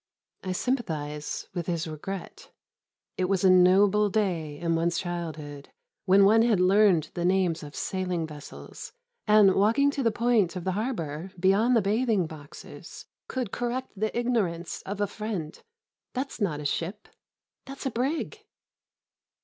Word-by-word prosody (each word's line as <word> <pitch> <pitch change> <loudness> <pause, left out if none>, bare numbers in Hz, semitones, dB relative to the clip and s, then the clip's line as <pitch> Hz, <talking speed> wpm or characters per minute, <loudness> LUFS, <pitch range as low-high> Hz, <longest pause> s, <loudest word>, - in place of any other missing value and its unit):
I 185 -1 -2
sympathise 155 - -3
with 175 -2 -4
his 170 -1 -2
regret. 170 +5 -7 0.7
It 185 - +1
was 190 0 0
a 190 - +6
noble 195 +3 +5
day 175 -8 -1
in 165 +1 -1
one's 170 +1 0
childhood 155 -5 -5 0.4
when 195 +1 +6
one 220 +3 +5
had 225 -5 +3
learned 185 -4 +4
the 175 - -3
names 180 -2 +1
of 145 -1 -10
sailing 180 -3 -2
vessels, 150 -2 -10 0.3
and, 210 -2 +6
walking 230 +9 +3
to 280 - -3
the 235 - +3
point 220 -5 +1
of 180 - -5
the 190 - -1
harbour 185 - -3
beyond 200 +7 +3
the 225 - +3
bathing 215 -2 +1
boxes, 155 -2 -11 0.2
could 250 -6 -3
correct 245 +2 -3
the 215 +3 -2
ignorance 200 -9 -1
of 200 +1 -4
a - - +3
friend: 200 -6 -5 0.5
"That's 265 -2 -4
not 160 -8 0
a 150 - -7
ship. 175 +8 -3 0.6
That's 275 +1 -9
a 265 - 0
brig." 275 - -2
190 Hz, 150 wpm, -27 LUFS, 170-220 Hz, 0.7 s, a